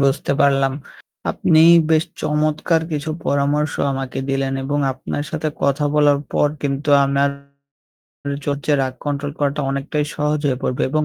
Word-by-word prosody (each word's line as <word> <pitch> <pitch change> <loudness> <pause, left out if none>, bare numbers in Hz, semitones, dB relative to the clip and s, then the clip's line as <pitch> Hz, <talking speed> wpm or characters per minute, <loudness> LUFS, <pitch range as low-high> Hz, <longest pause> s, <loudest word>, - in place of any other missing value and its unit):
বুঝতে 140 0 +1
পারলাম। 135 -1 +3 0.6
আপনি 160 -1 +3 0.3
বেশ 160 0 +4 0.2
চমৎকার 155 +2 +1
কিছু 150 +1 -2 0.2
পরামর্শ 145 +1 +1 0.2
আমাকে 135 -1 -4
দিলেন 135 0 -1
এবং 145 +2 -1
আপনার 130 +2 -5
সাথে 160 -2 -2
কথা 140 +1 +1
বলার 145 -1 +4
পর 145 - +3
কিন্তু 140 +1 -2 0.2
আমার 140 +1 +1 1.2
হচ্ছে 145 +1 -1
রাগ 130 -1 -2
control 145 0 -2
করাটা 145 0 0
অনেকটাই 140 +2 -2
সহজ 150 0 0
হয়ে 130 -3 0
পড়বে 125 - -1
এবং 155 +2 +1
145 Hz, 140 wpm, -20 LUFS, 135-150 Hz, 1.2 s, বেশ